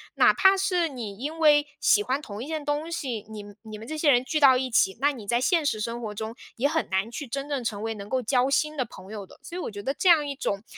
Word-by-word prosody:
哪 - - +5
怕 385 -1 +5
是 365 -3 +1
你 230 -9 -7
因 295 +7 -5
为 295 -2 +5
喜 205 - +4
欢 260 +6 -1
同 210 -6 -8
一 - - -8
件 315 -1 -4
东 295 +3 -2
西， 255 -10 -4
你 215 -1 -8 0.2
你 215 -1 -8
们 220 - -10
这 315 - -5
些 305 -1 +3
人 245 -1 +3
聚 305 +4 0
到 270 -3 +7
一 260 0 -2
起， 210 -5 +2
那 285 +1 +4
你 240 -7 -9
在 240 +3 +2
现 330 +3 +2
实 220 -6 0
生 235 +2 -3
活 215 -2 -5
中 220 +1 -5 0.2
也 260 +4 +2
很 320 +2 -1
难 190 +3 0
去 285 +3 -6
真 275 +4 -5
正 280 -4 -2
成 210 -3 -3
为 225 0 -2
能 200 -1 -8
够 260 +1 0
交 250 +2 +1
心 305 +3 +1
的 255 - 0
朋 190 -3 -13
友 210 -2 -6
的。 - - -18
所 345 - -8
以 - - -4
我 - - -4
觉 205 -1 -7
得 265 +6 -2
这 370 - -1
样 310 -4 +5
一 280 - -4
种 200 -6 -3
260 Hz, 310 characters per minute, -26 LUFS, 220-295 Hz, 0.2 s, 到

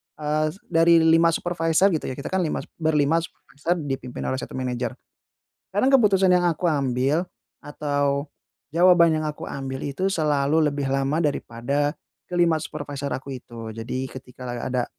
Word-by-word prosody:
eee, 155 0 0 0.2
dari 165 0 +5
5 165 +1 +5
supervisor 175 +2 +2
gitu 160 - -2
ya, 130 - -4
kita 140 - -6
kan 190 - +1
lima 165 -4 -1 0.2
berlima 155 0 +2
supervisor 165 0 -4
dipimpin 135 -3 -5
oleh 130 - -1
1 - - -7
manager. 125 -2 -3 0.8
Karena 205 +6 +2
keputusan 200 -8 +4
yang 180 -1 +4
aku 170 +1 +1
ambil 140 +3 +1 0.4
atau 145 -1 -1 0.4
jawaban 170 0 +5
yang 155 - -2
aku 150 -1 -5
ambil 135 -1 -5
itu 185 +8 -1
selalu 150 0 +2
lebih 140 -1 -3
lama 135 +3 0
daripada 140 +1 -1 0.3
ke-5 170 -3 +2
supervisor 145 -2 -5
aku 135 +1 -5
itu. 115 -2 -9
Jadi 120 +4 -4
ketika 130 0 -10
lagi 120 -1 -4
ada 125 -1 0
150 Hz, 150 wpm, -24 LUFS, 135-165 Hz, 0.8 s, dari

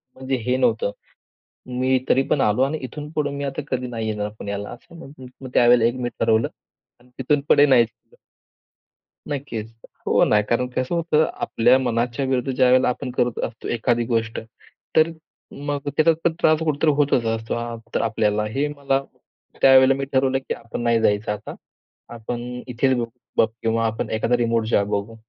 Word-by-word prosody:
म्हणजे 130 0 -2
हे 125 +1 +1
नव्हतं. 115 -5 +1 0.9
मी 130 +1 +2
तरी 135 - +4
पण 145 - +2
आलो 105 +4 +2
आणि 145 +3 0
इथून 145 +4 -7
पुढे 150 -2 -1
मी 140 0 -5
आता 140 +1 -3
कधी 125 -1 -1
नाही 115 -2 -4
येणार 105 -1 -2
पुण्याला 100 0 -5
असं 145 +7 -13
म्हटल 130 -1 -12
त्यावेळेला 120 0 +4
मी 120 - -1
ठरवलं 115 0 +2 0.5
आणि 125 - -24
तिथून 140 +2 +1
पुढे 145 - +7
नाही. 125 -3 +5 1.4
नक्कीच. 120 -6 -5 0.3
हो - - +4
ना. 105 - +3
कारण 120 +4 0
कसं 130 +6 -1
होतं? 160 -2 +2
आपल्या 120 +3 +3
मनाच्या 120 +1 -1
विरुद्ध 130 0 0
ज्यावेळेला 130 0 +4
आपण 125 +1 -3
करत 120 -1 0
असतो 115 -1 -7
एखादी 120 0 +1
गोष्ट. 115 -2 -1 0.6
तर 160 +1 +5 0.6
मग 145 -1 -1
त्याच्यात 155 +3 +3
पण 170 - +3
त्रास 155 0 +4
कुठेतरी 155 0 +2
होतच 140 -5 +2
असतो 110 0 -4
आप 115 -1 -6
आपल्याला. 105 -1 0
हे 135 +7 -1
मला 135 -1 0 0.6
त्यावेळेला 135 0 +7
मी 135 +1 -3
ठरवलं, 135 0 +2
की 135 - -4
आपण 115 0 -7
नाही 115 -1 +2
जायचं 105 -1 +1
आता. 105 - -7 0.6
आपण 120 +1 -5 0.2
इथेच 130 +2 +1
बघ 120 - -1 0.3
बघू - - +5 0.2
किंवा 115 0 +1
आपण 110 0 -3
एखादा 115 +2 +1
रिमोट 115 -1 +1
जॉब 100 -3 +1
बघू. 100 +3 -2
125 Hz, 165 wpm, -22 LUFS, 115-135 Hz, 1.4 s, पुढे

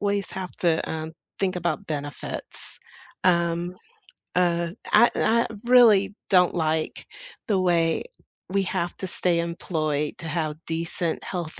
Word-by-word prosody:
ways 200 -1 0
have 185 -1 -5
to, 165 -2 +1
um, 160 0 -4 0.3
think 185 -2 0
about 175 +3 -2
benefits, 145 -1 -5 0.5
um, 170 0 +2 0.6
uh, 170 -1 +2 0.2
I 235 +3 +7
n - - 0
I 235 +1 +3 0.2
really 225 -5 +6
don't 180 -2 +4
like 160 -1 -1 0.4
the 200 -3 +2
way 170 -3 +2 0.5
we 195 +1 +1
have 175 -2 -2
to 190 - -4
stay 175 -1 +1
employed 155 -3 -1
to 165 - -6
have 155 -2 -1
decent 165 +1 -2
health 170 -4 -5
170 Hz, 135 wpm, -25 LUFS, 160-190 Hz, 0.6 s, I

